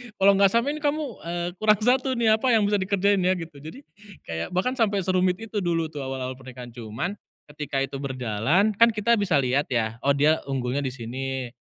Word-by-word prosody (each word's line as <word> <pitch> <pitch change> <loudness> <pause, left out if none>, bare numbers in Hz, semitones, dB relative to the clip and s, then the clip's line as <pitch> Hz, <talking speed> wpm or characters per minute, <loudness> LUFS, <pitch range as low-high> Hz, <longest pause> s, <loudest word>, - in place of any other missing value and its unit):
kalau 195 +1 +5
nggak 195 -1 +5
sama, 235 +5 +2
"Ini - - -6
kamu, 300 +1 +1 0.2
eee, 175 +1 -3
kurang 215 -1 +4
1 260 +1 +2
nih, 220 -2 +4
apa 260 - -1
yang 215 - +3
bisa 205 -1 +1
dikerjain 200 +1 +2
ya?" 185 +1 +2
Gitu, 165 -4 -8
jadi, 155 - -10 0.5
kayak 80 0 -3
bahkan 250 +8 0
sampai 205 -5 +1
serumit 185 0 +2
itu 220 -2 -4
dulu 165 -2 0
tuh 150 - -7
awal-awal 130 -1 -4
pernikahan. 125 -2 -10
Cuman 115 - -4 0.4
ketika 145 -2 -2
itu 135 0 -5
berjalan, 130 - +1
kan 230 - +8
kita 230 +3 +3
bisa 185 -6 +1
liat 130 +3 +1
ya, 115 -1 -1
oh, 140 - +3
dia 150 +3 +3
unggulnya 130 0 -1
disini, 130 0 -4
165 Hz, 195 wpm, -25 LUFS, 130-205 Hz, 0.5 s, kan